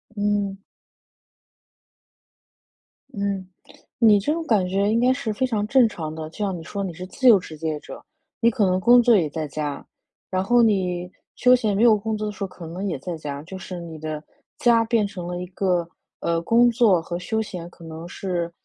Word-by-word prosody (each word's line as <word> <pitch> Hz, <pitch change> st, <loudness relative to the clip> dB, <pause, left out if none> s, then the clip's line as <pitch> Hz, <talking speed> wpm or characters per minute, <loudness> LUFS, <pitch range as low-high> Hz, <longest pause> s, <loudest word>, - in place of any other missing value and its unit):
嗯。 205 Hz, -1 st, 0 dB, 2.5 s
嗯。 200 Hz, -4 st, -3 dB, 0.5 s
你 215 Hz, -3 st, +6 dB
这 255 Hz, +10 st, 0 dB
种 330 Hz, 0 st, -3 dB
感 200 Hz, -8 st, +2 dB
觉 200 Hz, +2 st, +1 dB
应 225 Hz, -, +2 dB
该 250 Hz, +2 st, +4 dB
是 225 Hz, -4 st, -3 dB
非 260 Hz, +5 st, 0 dB
常 215 Hz, -4 st, -1 dB
正 255 Hz, -1 st, +5 dB
常 160 Hz, -7 st, -6 dB
的。 155 Hz, 0 st, -6 dB
就 165 Hz, -, -16 dB
像 195 Hz, -4 st, -1 dB
你 165 Hz, -, -9 dB
说 200 Hz, +4 st, -4 dB
你 180 Hz, -3 st, -4 dB
是 180 Hz, +3 st, -7 dB
自 260 Hz, +6 st, 0 dB
由 210 Hz, -, +8 dB
职业者， 155 Hz, -3 st, -6 dB, 0.4 s
你 235 Hz, 0 st, +5 dB
可 210 Hz, -2 st, +1 dB
能 185 Hz, 0 st, +2 dB
工 240 Hz, +4 st, +6 dB
作 235 Hz, -1 st, +5 dB
也 160 Hz, -6 st, +2 dB
在 155 Hz, +1 st, -4 dB
家， 145 Hz, 0 st, -4 dB, 0.4 s
然 185 Hz, 0 st, 0 dB
后 240 Hz, +4 st, +4 dB
你 180 Hz, -5 st, +1 dB, 0.3 s
休 250 Hz, 0 st, +5 dB
闲 220 Hz, -5 st, 0 dB
没 210 Hz, -, +2 dB
有 225 Hz, -3 st, +6 dB
工 220 Hz, +1 st, -3 dB
作 215 Hz, -, -3 dB
的 210 Hz, -, -3 dB
时 200 Hz, -, -6 dB
候 -, -, -2 dB
可 180 Hz, -3 st, -11 dB
能 180 Hz, +5 st, -5 dB
也 165 Hz, -7 st, -3 dB
在 170 Hz, +5 st, -5 dB
家， 145 Hz, -2 st, -6 dB
就 190 Hz, +3 st, -8 dB
是 185 Hz, -1 st, -7 dB
你 165 Hz, -2 st, -8 dB
的 155 Hz, -1 st, -5 dB, 0.4 s
家 235 Hz, -1 st, +4 dB
变 225 Hz, -3 st, +1 dB
成 180 Hz, -3 st, -7 dB
了 175 Hz, 0 st, -4 dB
一 180 Hz, -, -5 dB
个， 180 Hz, -2 st, 0 dB, 0.3 s
呃， 165 Hz, 0 st, 0 dB
工 235 Hz, +7 st, +4 dB
作 220 Hz, -7 st, +3 dB
和 175 Hz, +1 st, -5 dB
休 220 Hz, +5 st, -2 dB
闲 180 Hz, -5 st, -7 dB
可 175 Hz, -, -17 dB
能 160 Hz, +1 st, -8 dB
是 175 Hz, -2 st, -3 dB
195 Hz, 225 characters per minute, -23 LUFS, 170-220 Hz, 2.5 s, 由